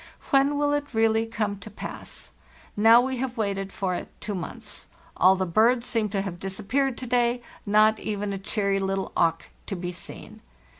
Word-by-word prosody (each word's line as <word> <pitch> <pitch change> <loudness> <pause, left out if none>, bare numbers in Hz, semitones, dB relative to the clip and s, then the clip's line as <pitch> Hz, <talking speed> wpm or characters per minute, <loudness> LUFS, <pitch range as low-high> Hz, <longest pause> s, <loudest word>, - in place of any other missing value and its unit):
When 275 +1 +4
will 290 0 +2
it 290 -4 -2
really 225 0 +3
come 210 -3 -2
to 200 - -9
pass? 210 - -7 0.4
Now 225 +3 +7
we 260 +1 -2
have 255 0 -3
waited 195 -2 -1
for 190 -2 -2
it - - -4
two 210 - -4
months. 180 -4 -6 0.3
All 190 +1 +6
the 190 0 -1
birds 230 +7 +3
seemed 220 -5 0
to 195 -1 0
have 180 -3 -5
disappeared 220 +8 -1
to 255 - -5
day; 245 0 +1 0.2
not 215 +1 +5
even 205 -1 -3
a 195 - -4
cheery 200 0 0
little 195 0 -2
auk 165 -1 +1 0.2
to 195 - -3
be 175 0 -4
seen. 175 - -9
215 Hz, 185 wpm, -26 LUFS, 195-240 Hz, 0.4 s, Now